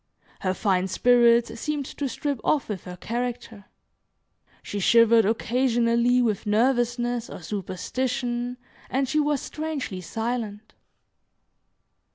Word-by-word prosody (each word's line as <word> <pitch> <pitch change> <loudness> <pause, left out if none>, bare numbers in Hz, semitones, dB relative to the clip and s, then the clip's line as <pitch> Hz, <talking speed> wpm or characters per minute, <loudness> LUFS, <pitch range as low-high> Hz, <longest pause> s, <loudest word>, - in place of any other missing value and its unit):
Her 185 -1 -1
fine 190 -2 +1
spirits 235 +2 +3
seemed 295 0 -2
to 275 +1 -4
strip 285 -2 -3
off 290 -6 +1
with 200 -4 -5
her 180 0 -8
character. 230 -2 -4 1.0
She 205 - -4
shivered 230 +2 +5
occasionally 235 +2 +2
with 215 -3 -1
nervousness, 240 +1 +1
or - - -9
superstition, 245 +6 -3 0.3
and 265 +1 0
she 305 +4 +1
was 295 -2 +1
strangely 300 -11 -4
silent. 220 +1 -4
235 Hz, 110 wpm, -25 LUFS, 215-250 Hz, 1.0 s, shivered